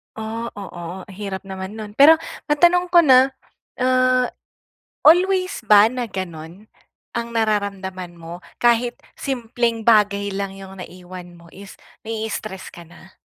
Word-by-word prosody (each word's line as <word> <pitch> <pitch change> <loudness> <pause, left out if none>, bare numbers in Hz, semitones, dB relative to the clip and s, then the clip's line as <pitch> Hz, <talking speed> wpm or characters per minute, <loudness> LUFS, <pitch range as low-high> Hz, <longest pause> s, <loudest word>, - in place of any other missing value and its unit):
Oh, 220 +1 -5
oo, 180 -2 -8
hirap 195 0 -6
naman 190 +1 -7
no'n. 215 -2 -8
Pero, 305 +4 +8 0.3
matanong 345 +4 +3
ko 345 -1 +5
na, 260 -2 +6 0.5
ah, 255 -1 +3 0.7
always 370 +3 +4
ba 210 0 +7
na 250 -2 -4
gano'n 185 +1 -8 0.5
ang 235 0 -3
nararamdaman 195 -4 -2
mo 170 +1 -9 0.2
kahit 240 +2 +2 0.2
simpleng 235 -3 -2
bagay 205 -3 +3
lang 195 0 -4
'yung 195 0 -11
naiwan 180 0 -10
mo 170 0 -17
is 195 0 -12 0.3
nai-stress 220 -3 -5
ka 170 -1 -12
na? 190 +2 -18
210 Hz, 125 wpm, -21 LUFS, 190-245 Hz, 0.7 s, Pero